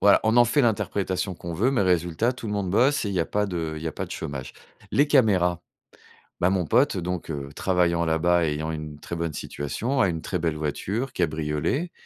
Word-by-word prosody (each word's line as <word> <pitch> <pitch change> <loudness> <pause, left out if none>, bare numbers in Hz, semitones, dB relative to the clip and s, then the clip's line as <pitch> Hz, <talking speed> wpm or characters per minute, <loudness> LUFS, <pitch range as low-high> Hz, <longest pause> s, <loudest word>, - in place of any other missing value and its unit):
Voilà, 100 0 +6
on 110 +2 +3
en 120 - +8
fait 120 +5 +2
l'interprétation 95 -5 0
qu'on 85 0 -6
veut, 115 +10 +2
mais 130 - +1
résultat, 90 +5 +1
tout 120 -2 -8
le 105 - -3
monde 100 -3 -1
bosse 130 +7 +3
et - - -1
il 100 - -3
y 90 - +2
a - - +1
pas 105 0 0
de 80 -4 -3
il 75 - -7
y - - -4
a 80 - -2
pas - - -4
de - - -13
chômage. 65 -2 -5 0.4
Les 145 +2 +3
caméras, 90 - +3 0.8
bah 90 - +3
mon 95 -2 +1
pote, 125 - +3
donc 90 -1 -3
heu, 70 -2 -5
travaillant 85 -2 +1
là-bas 85 +2 +2
et 75 - 0
ayant 80 +2 -3
une 75 -1 -6
très 85 - -6
bonne 85 -1 -2
situation, 115 - -3
a 100 - +4
une 80 -2 -2
très 90 - -2
belle 80 -2 0
voiture 100 - -3
cabriolet. 80 - -1
90 Hz, 230 wpm, -25 LUFS, 80-110 Hz, 0.8 s, en